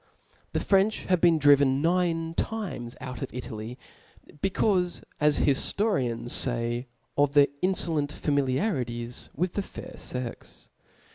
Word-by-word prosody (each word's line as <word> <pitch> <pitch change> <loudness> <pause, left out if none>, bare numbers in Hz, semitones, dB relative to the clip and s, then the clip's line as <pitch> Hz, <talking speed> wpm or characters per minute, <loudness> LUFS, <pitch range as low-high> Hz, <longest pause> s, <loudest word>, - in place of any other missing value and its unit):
The - - +1
French 200 +2 +2
have 180 -2 +3
been 170 -2 +5
driven 140 -2 +5
nine 165 0 +1
times 175 - -3
out 125 -2 -7
of - - -4
Italy, 120 -1 -6 0.6
becaufe, 190 -2 +1 0.2
as 150 -1 +3
hiftorians 135 - +1
fay, 120 0 -2
(*") - - -45
of 145 -1 +3
their 145 -1 +6
infolent 170 -5 +1
MjScePaf.. - - -9
familiarities 130 - -1
with 175 +4 -1
the 205 - -1
fair 255 +6 -9
fex. 125 -2 -7
145 Hz, 130 wpm, -27 LUFS, 125-180 Hz, 0.6 s, their